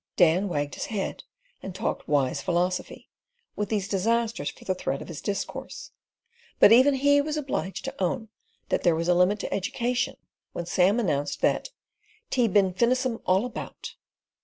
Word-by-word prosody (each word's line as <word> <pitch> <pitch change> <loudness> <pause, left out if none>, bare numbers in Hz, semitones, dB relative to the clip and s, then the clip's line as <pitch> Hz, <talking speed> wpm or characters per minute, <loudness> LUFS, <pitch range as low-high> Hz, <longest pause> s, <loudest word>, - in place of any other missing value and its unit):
Dan 180 +3 +4
wagged 145 -4 -2
his - - -4
head 210 -4 -4 0.4
and 190 -2 -7
talked - - -3
wise 140 -1 +1
philosophy, 180 +3 -2 0.4
with 210 -1 -2
these 205 -3 -1
disasters 225 +3 0
for - - -14
the 185 - +1
thread 140 -6 -3
of - - -9
his 165 -4 -7
discourse; 205 - -5 0.7
but - - +8
even 260 +4 +6
he 285 +2 +4
was 305 +1 -3
obliged 265 -9 -3
to - - -4
own 220 +5 -1 0.4
that - - +1
there 170 -2 +3
was 165 +1 -2
a - - +6
limit 180 +4 +3
to - - -4
education 240 +5 -1 0.4
when 170 - -4
Sam 185 +5 +3
announced 145 -9 -1
that - - +1 0.6
"Tea 245 -3 +3
bin 195 -2 +3
finissem 245 +3 +1
all 190 +5 +3
about." 250 - -7
200 Hz, 165 wpm, -26 LUFS, 175-235 Hz, 0.7 s, but